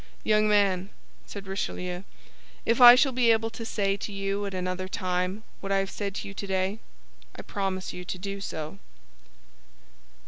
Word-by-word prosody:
"Young 215 0 +3
man," 195 -2 +2 0.4
said 200 -1 -8
Richelieu, 180 -2 -3 0.6
"if 230 +2 +2
I 245 0 +12
shall 270 +1 +4
be 245 -2 +3
able 225 0 +1
to 230 0 -7
say 200 -3 0
to 205 - -5
you 195 +1 -2
at 195 - -6
another 185 0 -3
time 185 +2 -2 0.2
what 195 - -5
I 195 - +3
have 195 0 -1
said 200 -2 -4
to - - -4
you 195 - -8
today, 190 +1 -2 0.6
I - - -8
promise 190 -2 -3
you 180 - -7
to 185 - -4
do 195 +2 -5
so." 155 - -5
195 Hz, 170 wpm, -27 LUFS, 185-210 Hz, 0.6 s, I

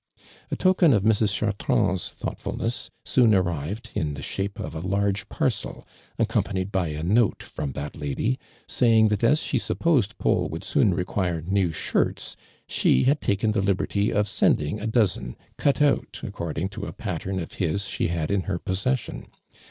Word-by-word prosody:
A - - -1
token 185 -5 +4
of 105 -3 +2
Mrs. 110 -1 +3
Chartnuwl's 105 -3 0
thoughtful - - -5
ness 115 +2 -2 0.2
^oon 115 -5 +4
arrived 90 - -2
in 75 -2 -1
the 70 - -7
shape 100 +1 -3
of - - -5
a 80 - -4
large 100 +3 -1
parcel, - - -2 0.3
accompanied 95 0 0
l)y 95 -3 +1
a 75 0 -4
note 105 +5 +2
from 70 -4 -5
that 70 +1 -5
lady, 80 - -1 0.3
saying 115 -3 +4
that 105 0 -1
as 145 +7 +4
she - - 0
supposed 130 - +1
Paul - - +1
would 80 +4 -6
soon 110 - +2
require 90 -3 -1
new 95 -1 +1
shirts, 80 - -1 0.3
she 65 - +3
had 140 +3 +3
taken 105 +2 +1
the 105 -2 +1
liberty 100 +1 +1
of 105 0 +1
sending 75 0 +1
a 110 - -3
dozen, 105 - +1 0.2
cut 145 +1 +3
out 145 - +1
according 85 +2 -3
to 100 - -6
a - - -6
pattern 95 0 -4
of 85 - -6
his 95 +3 0
she - - -1
had 85 -1 -2
in 100 -1 +2
licr 90 -2 -4
possession. 110 +7 -2
100 Hz, 170 wpm, -25 LUFS, 85-110 Hz, 0.3 s, token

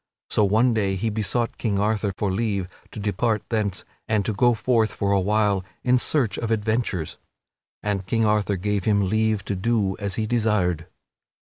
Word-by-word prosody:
So 105 - +3
one 110 +5 +3
day 100 -3 0
he 110 +4 -1
besought 115 +2 -1
King 105 -4 0
Arthur 105 0 +1
for 100 -2 0
leave 100 -2 -1 0.2
to - - -8
depart 105 +1 0
thence 105 -5 -1 0.2
and 105 -3 +1
to 110 - 0
go 120 +4 +3
forth 115 -1 +2
for 100 0 -1
a 100 - +4
while 100 0 +1 0.2
in 125 0 +3
search 120 -8 +1
of 115 - -3
adventures; 110 -6 -1 0.6
and 100 -2 -2
King 115 +2 +1
Arthur 105 -1 +2
gave 100 +1 -1
him 100 -3 +2
leave 110 0 +1
to 100 - -2
do 100 -1 0
as 100 -2 -2
he 110 - -1
desired. 105 -8 +1
105 Hz, 180 wpm, -24 LUFS, 100-110 Hz, 0.6 s, a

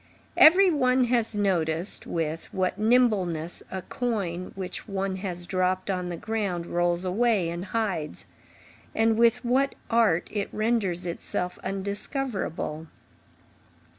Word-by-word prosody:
Every 365 +4 +7
one 255 -4 +3
has 235 -2 +1
noticed 175 -3 0
with 165 -1 -3
what 185 +1 -1
nimbleness 210 -8 +2
a 190 -1 -5
coin 190 -8 -3
which 190 +2 -6
one 195 -1 -2
has 180 -2 -4
dropped 185 +1 0
on 180 -1 -2
the 175 - -4
ground 200 -5 -2
rolls 175 +1 0
away 200 -2 +1
and 170 +2 -5
hides, 190 -8 -2 0.7
and 225 0 +3
with 235 +2 +3
what 265 +3 +2 0.2
art 225 -8 +3
it 205 -2 -2
renders 210 -6 0
itself 180 +1 -3
undiscoverable. 195 - -3
195 Hz, 120 wpm, -26 LUFS, 175-230 Hz, 0.7 s, Every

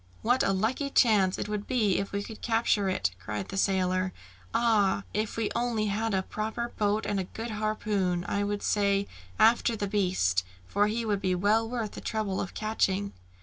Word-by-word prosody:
"What 245 +3 +3
a - - +2
lucky 225 +9 0
chance 210 -8 +4
it - - -3
would 210 -1 -3
be 215 -8 +2
if 200 - -4
we 200 0 -2
could 220 +1 -9
capture 225 -4 +2
it!" 95 - 0
cried 105 +1 -5
the - - -5
sailor. 185 -1 +1 0.4
"Ah, 205 -4 +2
if 215 +2 -2
we 225 -2 -1
only 235 -3 0
had 220 0 0
a 190 - +1
proper 220 +4 -3
boat 210 +1 +1
and 205 -1 -1
a 190 - -2
good 225 +5 -6
harpoon, 210 -4 -1
I 200 - 0
would 205 0 -2
say, 200 -1 +2 0.3
'After 230 +1 +4
the 205 - -2
beast,' 180 - +1 0.2
for 205 - +2
he 225 +2 -1
would 205 -2 0
be 185 -1 +1
well 215 +5 +2
worth 230 -4 -3
the - - -8
trouble 215 -4 -2
of 190 - -6
catching!" 205 -2 0
205 Hz, 190 wpm, -28 LUFS, 190-220 Hz, 0.4 s, chance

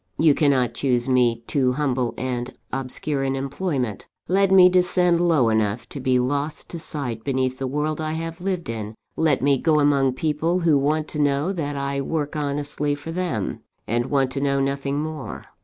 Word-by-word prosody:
You 155 -2 +5
cannot 140 -5 +2
choose 125 -2 0
me 120 -3 +2
too 130 -2 +1
humble 130 -3 -1
and 125 -1 -3 0.2
obscure 135 +2 -2
an 135 0 0
employment; 135 - -3 0.2
let 195 +1 +3
me 190 -1 +8
descend 180 -1 +3
low 160 -9 +3
enough 110 0 0
to 140 - -7
be 130 -1 +2
lost 145 +4 -2
to 170 - -4
sight 125 -8 -4
beneath 130 -2 -1
the 135 - -2
world 150 +3 -2
I 155 0 -2
have 165 +2 -5
lived 185 -2 -2
in; 110 -1 -5 0.2
let 155 -5 +2
me 140 -1 +3
go 155 +1 +3
among 140 -3 +3
people 160 +6 0
who 165 -3 +4
want 150 +2 +1
to 150 - -4
know 145 +4 +1
that 145 -5 -3
I 140 0 -2
work 150 +1 -2
honestly 145 0 -1
for 145 +3 -7
them, 165 - -2 0.3
and 120 +3 0
want 135 -2 +1
to 135 - -3
know 140 -1 +1
nothing 140 +1 -1
more. 155 -3 -6
140 Hz, 185 wpm, -23 LUFS, 130-155 Hz, 0.3 s, me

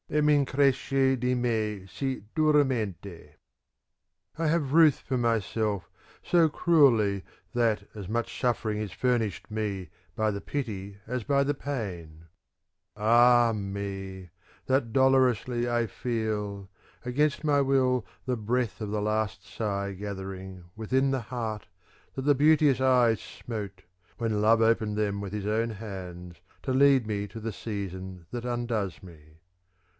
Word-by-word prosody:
] - - -49
E' 150 - +2
vi' 150 0 +4
incresce 135 -1 +2
di 125 +1 0
vie 110 -5 -1
si 130 +2 -4
durarnente. 110 - 0 1.0
I 165 - -2
I - - +2
HAVE 150 -4 0
ruth 160 -3 +7
for 130 - -3
myself 110 -5 0 0.3
so 170 -2 +4
cruelly 120 - +3 0.3
that 110 -4 +1
as 100 -3 -7
much 115 +1 -2
suffer 120 -3 0
ing 105 - -2
is 105 -2 -4
furnished 120 -7 -1
me 100 -5 -3 0.3
by 110 0 +1
the 100 -1 -5
pity 100 -8 -5
as 125 0 -3
by 140 +3 +2
the 145 +1 0
pain: 90 - -6 0.7
Ah 120 +2 +5
me! 95 -2 -5 0.3
that 130 -3 +1
dolorously 125 -2 +3
I 120 -1 +1
feel, 105 -3 -3 0.4
against 145 +5 +1
my 145 -2 +3
will, 130 -3 +2 0.2
the 130 -1 0
breath 115 +1 -1
of 105 - -3
the 105 0 -1
last 105 -1 -1
sigh 100 -2 -3
gathering 95 -2 -7
Within 130 +5 +1
the 135 -2 0
heart 110 -3 -5 0.5
that 130 - -3
the 145 +1 +4
beauteous 150 -2 +4
eyes 125 -4 +4
smote 100 -5 -7 0.3
When 110 -3 -1
love 115 +2 +4
opened 110 -2 +2
them 100 -2 -1
with 100 -2 -5
his 105 -1 -4
own 110 +2 0
hands 90 -5 -8 0.2
to 130 - -1
lead 135 -3 +5
me 105 -1 -2
to 115 - -9
the 110 0 -4
season 95 -4 -6
that 120 -1 -4
undoes 120 -6 -2
me. 80 -3 -15
110 Hz, 145 wpm, -28 LUFS, 100-130 Hz, 1.0 s, ruth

